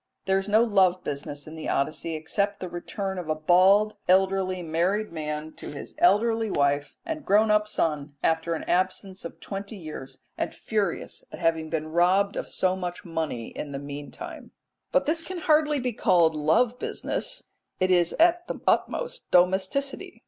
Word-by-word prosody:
There 190 0 +3
is 195 +1 -5
no 220 +2 +5
love 190 -5 +3
business 145 0 -5
in 155 - -10
the 160 - -5
Odyssey 155 +3 -1
except 200 +6 -1
the 185 - -4
return 190 +2 -4
of 170 -3 -7
a 155 - +2
bald 190 +6 +4
elderly 190 -1 +2
married 180 +7 0
man 155 -1 -4
to - - -8
his 145 - -8
elderly 225 -8 +3
wife 145 -2 0
and 320 -2 -4
grown 210 +2 +4
up 210 0 +3
son 150 -7 -1
after 165 +1 +1
an - - -5
absence 185 +1 -1
of 170 - -8
twenty 200 +2 -6
years, 155 -7 -8 0.2
and - - -2
furious 205 -5 -2
at - - -7
having 165 -2 0
been 155 -1 -2
robbed 185 +4 +3
of - - -4
so 185 0 +1
much 180 -1 -5
money 160 -9 -3
in 145 -2 -6
the - - -3
meantime. 145 +1 -8 0.4
But 275 0 +3
this 325 +2 0
can 370 +3 -6
hardly 305 -3 +3
be 250 -1 -2
called 170 -5 +4
love 225 +12 +2
business; - - -2 0.4
it 185 0 +2
is 175 -2 +3
at 350 +1 +3
the - - -4
utmost - - 0
domesticity. 190 +10 +1
185 Hz, 170 wpm, -26 LUFS, 160-210 Hz, 0.4 s, no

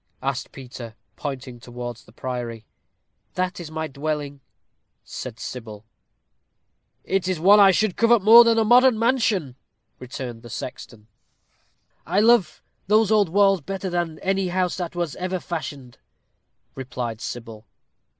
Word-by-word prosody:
asked 135 -1 -3
Peter, 125 -4 -10 0.2
pointing 130 -4 -6
towards 120 -1 -8
the - - -18
priory. 120 -2 -6 0.7
"That 185 0 -2
is 170 -3 -7
my 160 0 -4
dwelling," 145 -1 -4 0.6
said 120 -3 -8
Sybil. 110 -4 -8 1.2
"It 190 -1 -1
is 185 -3 -1
one 200 +5 +6
I 200 -1 +8
should 195 0 +1
covet 230 -3 +4
more 230 +3 +9
than 230 -1 +3
a 225 - +4
modern 245 +2 +5
mansion," 220 - 0 0.4
returned 125 -2 -7
the 120 - -12
sexton. 115 -2 -8 1.0
"I 185 +4 0
love 220 -6 +3 0.2
those 215 +1 +3
old 210 -5 +3
walls 195 0 +3
better 190 +4 -5
than 170 -2 -2
any 195 0 0
house 180 0 -1
that 175 -2 -5
was 175 -4 -3
ever 185 0 -3
fashioned," 145 -8 -7 0.7
replied 125 -3 -5
Sybil. 115 -2 -8
160 Hz, 135 wpm, -23 LUFS, 125-195 Hz, 1.2 s, more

